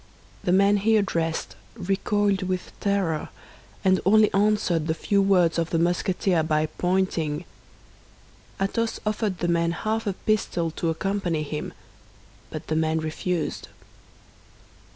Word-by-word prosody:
The 180 - +1
man 200 +2 +5
he 220 +2 +3
addressed 165 -5 -1 0.2
recoiled 200 +1 0
with 185 -1 -3
terror, 195 -6 0 0.6
and 185 0 +4
only 215 +2 +5
answered 195 -6 +2
the 160 - 0
few 200 +4 +1
words 180 -4 +3
of 165 0 -1
the 165 - 0
Musketeer 175 +1 +1
by 155 -1 +1
pointing. 175 -2 -1 1.1
Athos 225 +4 -1
offered 210 -3 -1
the 175 - -1
man 170 0 +2
half 220 +4 -2
a 200 - +1
pistole 180 -5 -1
to 165 +1 -2
accompany 175 -2 -1
him, 150 0 -5 0.8
but - - -7
the 155 - -2
man 160 0 +1
refused. 160 +2 -2
180 Hz, 130 wpm, -25 LUFS, 165-200 Hz, 1.1 s, man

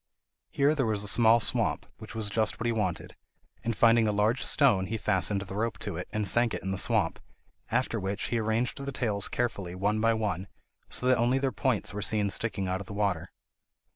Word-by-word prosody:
Here 145 +2 +2
there 135 -6 0
was 105 -2 +1
a - - -3
small 115 +2 +5
swamp, - - +1
which 110 +1 -10
was 105 -2 -1
just 110 0 0
what 120 - -4
he 120 - +2
wanted, 105 -6 -2 0.5
and 115 -2 -2
finding 115 -1 +4
a - - +2
large 105 +5 +1
stone, 100 -10 +3
he 110 +4 -3
fastened 100 -1 +2
the 95 - -9
rope 110 0 -2
to - - -5
it, - - -5
and 105 -1 -2
sank 120 +3 +2
it - - -7
in 95 - -3
the 95 - 0
swamp, - - +2 0.5
after 120 -1 0
which 100 +2 -3
he 120 - 0
arranged 115 +5 -1
the 140 - -4
tails 105 -6 0
carefully 100 -7 -3
one 105 +3 0
by 115 0 +3
one, 100 -3 -3 0.4
so - - -1
that 130 -2 +3
only 120 +3 +2
their 135 -1 0
points 130 -6 -1
were 105 - -4
seen 105 -1 +1
sticking 100 -4 0
out 95 +1 -2
of 100 - -10
the - - -8
water. 100 -5 -1
110 Hz, 220 wpm, -28 LUFS, 100-120 Hz, 0.5 s, small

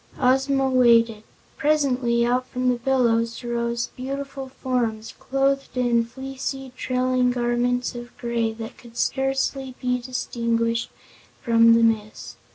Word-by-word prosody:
Ozma 270 +1 +2
waited. 235 -4 +4 0.4
Presently 255 -6 +2
out 250 +1 0
from 255 0 -1
the 250 - +1
billows 235 -2 +1
rose 235 0 -2
beautiful 270 +1 -5
forms, 235 -4 -2
clothed 275 0 0
in 240 -2 +2
fleecy, 270 +1 -6
trailing 255 0 +1
garments 245 0 0
of 240 0 -9
gray 235 -1 -1
that 225 0 -8
could 235 -1 -14
scarcely 270 0 -1
be 250 0 -1
distinguished 230 -2 -1 0.5
from 230 -1 +6
the 230 - +4
mist. 215 -2 -1
245 Hz, 120 wpm, -23 LUFS, 235-265 Hz, 0.5 s, from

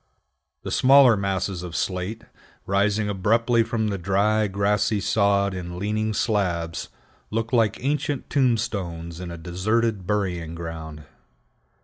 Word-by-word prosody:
The - - -5
smaller 135 -2 +6
masses 95 -2 -2
of 90 -2 -7
slate, 95 +4 -3 0.4
rising 100 +2 +1
abruptly 115 +4 +2
from 110 -1 -1
the 100 -2 -3
dry, 105 +4 +2
grassy 100 +2 +1
sod 100 -1 +2
in 90 -1 -6
leaning 110 +2 -1
slabs, 90 -8 -1 0.4
look 115 +1 -3
like 115 -4 +3
ancient 145 -1 -1
tombstones 100 - -1
in 90 -1 -6
a 85 - -7
deserted 95 +4 -1
burying 90 -6 -2
ground. 80 -2 -7
100 Hz, 120 wpm, -24 LUFS, 90-110 Hz, 0.4 s, smaller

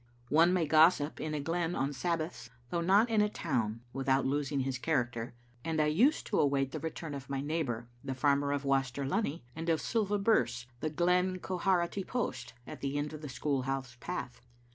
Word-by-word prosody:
One 165 +4 +5
may 180 -3 +2
gossip 155 0 +4
in 155 -1 -2
a - - -1
glen 165 +3 -1
on 135 +2 -1
Sabbaths, 155 -3 -3 0.2
though 170 - 0
not 200 +7 +4
in 220 -2 +4
a 210 - +3
town, 115 - -2
without 135 0 +1
losing 140 0 0
his 130 -1 -2
character, 125 -6 -1 0.3
and 160 -1 -1
I 155 - +4
used 225 - +3
to - - 0
await 135 -2 +2
the - - -4
return 160 -1 -5
of 140 -1 -7
my 135 -1 -1
neighbour, 135 -6 -2 0.2
the 135 -1 -3
farmer 140 +1 +2
of 145 0 -1
Waster 135 0 +1
Lunny, 150 - -1
and 165 +1 -3
of 160 -1 +3
Silva 210 -3 0
Birse, 125 - +2
the 155 - -1
Glen 180 +3 +2
Quharity 185 0 0
post, 130 - -3
at - - -9
the 140 +1 -2
end 145 +1 -2
of 155 - -7
the 150 - -6
school 135 +1 -1
house 130 -1 -3
path. 150 -6 -5
145 Hz, 195 wpm, -32 LUFS, 135-170 Hz, 0.3 s, One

